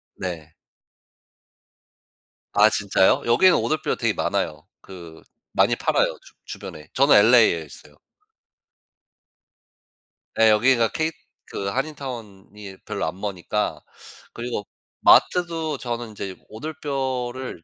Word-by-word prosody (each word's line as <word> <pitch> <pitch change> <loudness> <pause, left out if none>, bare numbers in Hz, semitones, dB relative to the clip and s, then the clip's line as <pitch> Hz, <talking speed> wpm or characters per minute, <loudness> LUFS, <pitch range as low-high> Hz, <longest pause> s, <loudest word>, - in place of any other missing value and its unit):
네. 80 -4 -6 2.0
아 105 +1 +6
진짜요? 100 -2 +2
여기에는 170 +11 +5
오돌뼈가 155 0 -1
되게 - - 0
많아요. 75 0 -2 0.2
그 85 -4 -12 0.3
많이 - - +3
팔아요 - - 0
주 - - -18
주변에. 75 - -9
저는 140 +2 +5
LA에 110 -6 +5
있어요. 75 +1 -14 2.4
네. 110 0 +5
여기가 115 +1 +3
케이 160 0 -1 0.3
그 100 - -5
한인타운이 105 -7 -6
별로 - - -3
안 85 +4 -5
머니까 105 +1 -3 0.5
그리고 120 -4 -5 0.3
마트도 165 -4 +3
저는 120 -2 -5
이제 100 -3 -6
오돌뼈를 130 - -4
110 Hz, 230 characters per minute, -23 LUFS, 95-135 Hz, 2.4 s, 아